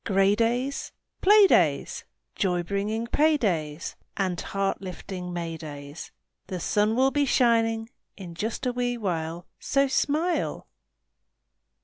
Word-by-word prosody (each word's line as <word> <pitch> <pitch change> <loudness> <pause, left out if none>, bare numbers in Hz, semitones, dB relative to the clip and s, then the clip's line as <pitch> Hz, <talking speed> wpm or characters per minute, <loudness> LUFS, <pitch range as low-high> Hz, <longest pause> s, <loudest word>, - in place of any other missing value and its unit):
Gray 195 0 +3
days? 240 +5 -1 0.3
Play 415 +1 +7
days! - - +2 0.3
Joy 180 -4 0
bringing 205 +5 -2
pay 305 +5 +3
days 165 - -2 0.2
And 185 -3 -1
heart 195 0 -2
lifting 180 -1 -6
May 170 -2 -4
days! 145 -1 -9 0.4
The 185 - -4
sun 210 +5 +1
will 265 +2 +3
be 290 0 +2
shining 225 -3 +2 0.3
in 180 -4 -8
just 220 +9 -3
a 250 - +1
wee 245 0 -1
while 170 -5 -3
So 275 0 +2
smile! 300 - 0
205 Hz, 125 wpm, -26 LUFS, 175-245 Hz, 0.4 s, Play